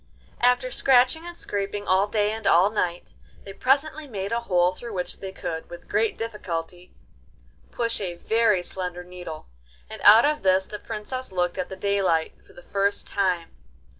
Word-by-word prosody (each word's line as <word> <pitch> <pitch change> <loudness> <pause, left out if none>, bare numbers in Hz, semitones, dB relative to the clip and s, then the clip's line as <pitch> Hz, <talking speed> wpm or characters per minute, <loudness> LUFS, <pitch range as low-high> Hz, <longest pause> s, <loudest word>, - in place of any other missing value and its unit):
After 250 +1 +2
scratching 265 +6 +3
and 345 0 -8
scraping 205 0 -3
all 190 +2 +3
day 210 0 +1
and 220 -1 -4
all 185 +5 +5
night, 175 -5 -2 0.3
they 195 - -9
presently 285 +6 +1
made 200 -5 -4
a 235 - +1
hole 180 -5 +2
through 235 +3 -8
which 180 -2 -4
they 190 - -6
could, 160 -3 -5
with 175 - -11
great 220 0 0
difficulty, 180 -6 -5 0.8
push 230 -2 -2
a 180 -3 -3
very 220 0 +2
slender 180 -1 -3
needle, 180 -3 -9 0.4
and - - -9
out 220 +4 +9
of 300 +1 +1
this 190 0 +3
the 210 - -8
Princess 255 +4 -5
looked 180 0 -1
at 180 - -2
the 190 - -6
daylight 190 -4 0
for - - -20
the 175 - -14
first 200 +2 0
time. 180 -4 0
200 Hz, 170 wpm, -25 LUFS, 180-230 Hz, 0.8 s, out